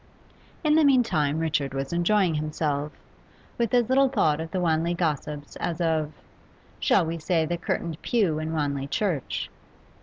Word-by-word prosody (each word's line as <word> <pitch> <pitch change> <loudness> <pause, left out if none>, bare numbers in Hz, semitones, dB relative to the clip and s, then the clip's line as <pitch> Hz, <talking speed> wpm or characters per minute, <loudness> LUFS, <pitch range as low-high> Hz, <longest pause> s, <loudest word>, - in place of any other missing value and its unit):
In 305 -1 +3
the 315 0 +5
meantime 230 - +3
Richard 150 -4 -1
was 135 +3 -3
enjoying 175 +1 +2
himself, 150 -1 -2 0.7
with 235 -3 +1
as 245 -2 +3
little 270 +1 +4
thought 155 - +2
of 160 - -5
the 185 - -2
Wanley 170 0 +1
gossips 150 -3 -3
as 170 -1 -3
of 160 -3 0 0.7
shall - - +3
we 165 +1 -3
say, 165 0 +1
the 165 - -2
old 170 - -4
curtained 165 -2 -3
pew 195 -11 +1
in 155 0 -3
Wanley 140 -3 -1
Church? 170 - -2
160 Hz, 160 wpm, -26 LUFS, 150-185 Hz, 0.7 s, the